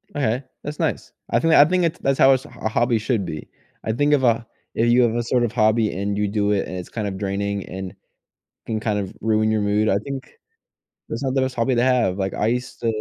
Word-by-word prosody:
Okay, 125 -2 0 0.2
that's 145 0 -6
nice. - - -2 0.2
I - - +3
think 165 0 +2
I 145 - +8
think 180 +3 +1
it's 170 +1 0
that's 135 0 0
how 135 - +7
a - - +7
s 130 0 -1
a 110 - -5
hobby 120 +1 +2
should 110 -2 -1
be. 75 -3 -6 0.4
I 110 - -1
think 145 +6 +2
of 140 - +3
a 115 -1 +2 0.3
if 115 - +2
you 125 +1 +5
have 115 -1 +1
a 120 - 0
sort 120 +1 +1
of 120 - 0
hobby, 110 -1 +2
and 100 +1 -2
you 105 0 +1
do 105 0 0
it, 100 -2 0
and 90 - -5
it's 90 - -7
kind 110 -3 -3
of 95 -1 -4
draining, 100 0 -2
and 95 0 -6 0.7
can 110 -1 -2
kind 105 -2 -1
of 95 -2 -5
ruin 110 0 +2
your 110 -1 +1
mood, 105 +1 +1
I 95 - +3
think 135 -1 -6 0.8
that's - - -4
not 135 0 -1
the 135 - +3
best 130 0 -2
hobby 120 +2 +1
to 120 - +2
have. 125 -8 +2
Like, 95 -1 -2
I 105 - 0
used 125 +2 -2
to - - -1
115 Hz, 260 wpm, -22 LUFS, 105-130 Hz, 0.8 s, I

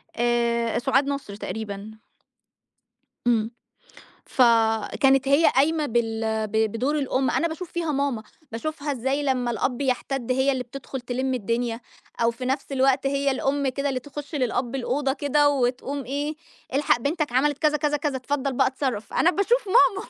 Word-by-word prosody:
آآ 235 -1 +1
سُعاد 270 +3 +2
نصر 275 -8 -4
تقريبًا. 205 +1 -6 1.3
إمم. 225 -1 +2 0.8
فكانت 240 +3 +3
هي 285 +4 +5
قايمة 300 +3 +3
بال 225 -2 0
ب 205 - -14 0.2
بدور 270 +7 0
الأم. 265 -1 0
أنا 335 - +1
باشوف 325 +2 -7
فيها 330 -3 -1
ماما، 275 -5 -1 0.3
باشوفها 290 +4 -3
إزاي 265 +3 -1
لمّا 255 -3 0
الأب 245 +2 -1
يَحتّد 260 -1 -1
هي 265 +2 +2
اللي 260 -1 -2
بتدخُل 265 +1 -7
تِلِم 255 +1 -2
الدنيا 230 +1 -2 0.4
أو 230 - +4
في 235 +2 -7
نفس 270 +2 -2
الوقت 270 0 +2
هي 280 0 +1
الأم 275 +1 0
كده 275 +2 -1
اللي 260 -2 -1
تخُش 290 +3 -8
للأب 250 -2 -1
الأوضة 270 +1 0
كده 290 +1 +2
وتقوم 270 +1 -1
إيه، 285 +5 -2 0.4
إلحق 280 -3 +3
بنتك 295 +1 -1
عملِت 285 +3 +2
كذا، 305 -1 +2
كذا، 295 0 0
كذا 290 -2 -2
اتفضّل 275 +1 -2
بقى - - +3
اتصرّف. 260 -5 -3
أنا 350 - +4
باشوف 420 +3 +1
ماما، 410 -1 +4
265 Hz, 155 wpm, -24 LUFS, 240-285 Hz, 1.3 s, هي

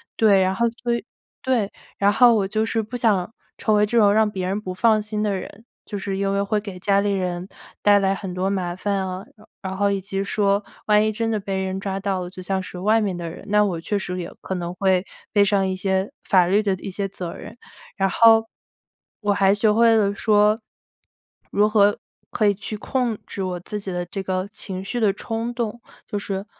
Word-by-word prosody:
对， 205 -3 +5
然 185 0 +2
后 235 +4 +2 0.2
所 240 -1 +1
以 235 - -4 0.4
对， 245 -7 +1 0.3
然 200 +1 +3
后 245 0 +6
我 200 -3 +1
就 215 +2 0
是 225 0 0
不 220 +4 -8
想 220 -4 +1 0.2
成 215 - +1
为 210 - +4
这 235 +3 -1
种 205 -3 +6
让 215 0 +3
别 185 -2 -3
人 195 +3 -2
不 185 - -5
放 215 +3 +3
心 210 0 -3
的 205 -2 0
人， 200 +4 -8 0.2
就 205 - -5
是 195 0 -3
因 195 0 0
为 200 0 +1
会 210 +1 0
给 200 -3 -8
家 200 +1 +2
里 205 0 0
人 180 -2 -2 0.3
带 205 0 +6
来 195 -1 +2
很 190 -2 -5
多 185 +1 0
麻 180 -3 -2
烦 200 +2 -1
啊， 190 0 -4
然 215 - -20 0.2
然 190 0 -4
后 200 +1 +2
以 200 - 0
及 195 +1 -3
说 200 0 +1 0.2
万 210 0 +4
一 215 - +1
真 225 +1 -2
的 215 - 0
被 195 -1 -3
人 190 0 -3
抓 195 0 -3
到 195 -1 -1
了， 175 - -6
就 185 0 -10
像 190 +1 -1
是 180 - -8
外 215 +4 +3
面 195 -4 -1
的 170 -1 -5
人， 175 - -10
那 210 0 +4
我 175 -5 -2
确 205 +5 -1
实 180 -1 -4
也 170 - -5
可 190 - -4
能 175 -1 -4
会 190 -1 +2 0.3
背 205 -2 +5
上 195 -1 +2
一 190 - -1
些 190 +1 -1
法 185 -3 +4
律 200 +4 +3
的 200 -2 +1
一 190 - -7
些 195 +1 -3
责 180 -3 -6
任。 - - -10 0.4
然 195 -1 +2
后 225 +2 +6 0.8
我 205 -1 +2
还 195 -1 +4
学 210 +1 +3
会 230 +1 +5
了 200 -2 +2
说 210 +1 +3 0.9
如 205 +1 +3
何 205 -1 +4 0.3
可 215 - +2
以 205 - +4
去 210 +2 -6
控 240 0 -1
制 195 - -4
我 180 -1 -3
自 210 +4 -6
己 195 -2 -6
的 175 0 -3
这 195 +3 -5
个 185 0 -2
情 190 -1 -6
绪 240 +4 -3
的 215 -3 +3
冲 225 +3 -4
动， 235 -1 -3 0.3
就 205 - -3
是 195 0 -4
200 Hz, 250 characters per minute, -23 LUFS, 190-215 Hz, 0.9 s, 后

